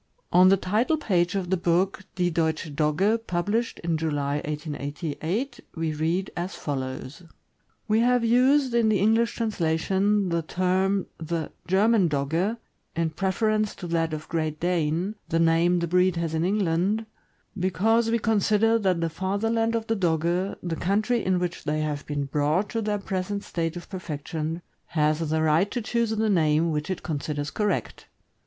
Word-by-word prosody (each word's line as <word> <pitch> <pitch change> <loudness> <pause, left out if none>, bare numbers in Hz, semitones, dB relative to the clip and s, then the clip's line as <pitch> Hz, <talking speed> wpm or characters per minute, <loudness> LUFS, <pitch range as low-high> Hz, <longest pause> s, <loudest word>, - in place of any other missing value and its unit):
On 180 +1 +7
the 195 - +5
title 220 - +1
page 180 - +1
of 185 -2 -2
the 190 - +3
book 180 +3 0
"Die 180 -1 +1
Deutsche 160 -2 -1
Dogge," 165 +9 +2
published 205 +7 -1
in 170 -1 0
July, 145 -3 -1
1888, 155 - -4 0.2
we 160 -2 -1
read 165 +5 -1
as 175 +2 -4
follows: 130 +2 -5 0.7
We 215 +1 +3
have 245 0 +3
used 255 +3 +4
in 235 -2 +3
the 215 - +3
English 225 +4 +2
translation 195 0 +1
the 170 0 0
term 185 +3 0
the 165 -1 -3
' - - -44
' - - -29
German 205 -2 +4
Dogge 160 +10 0 0.2
" - - -45
in 160 -1 0
preference 215 +4 0
to 180 - -8
that 165 -1 0
of 155 0 -5
"Great 155 -2 -2
Dane," 175 +2 0 0.2
the 165 - +1
name 165 +2 +3
the 170 0 -1
breed 180 +1 +3
has 165 -1 -2
in 160 0 0
England, 195 +2 +1 0.5
because 215 +5 +2
we 230 - +2
consider 225 +1 +2
that 185 -5 +1
the 165 - +1
fatherland 225 +7 0
of 225 -1 -1
the 225 - 0
Dogge, 175 +1 0
the 170 -2 -2
country 215 +7 0
in 185 0 +2
which 180 -1 -3
they 155 +1 -1
have 150 -1 -3
been 145 -1 -2
brought 150 +8 0
to 230 - -2
their 210 -1 0
present 195 +1 -3
state 165 0 -3
of 175 - -9
perfection, 165 -2 -5 0.2
has 155 0 +1
the 160 0 +1
right 160 +6 +3
to 245 - -2
choose 235 0 0
the 220 0 0
name 165 -4 +2
which 150 +1 -2
it 185 - -3
considers 145 -2 -3
correct. 210 -1 -2
180 Hz, 170 wpm, -26 LUFS, 160-210 Hz, 0.7 s, On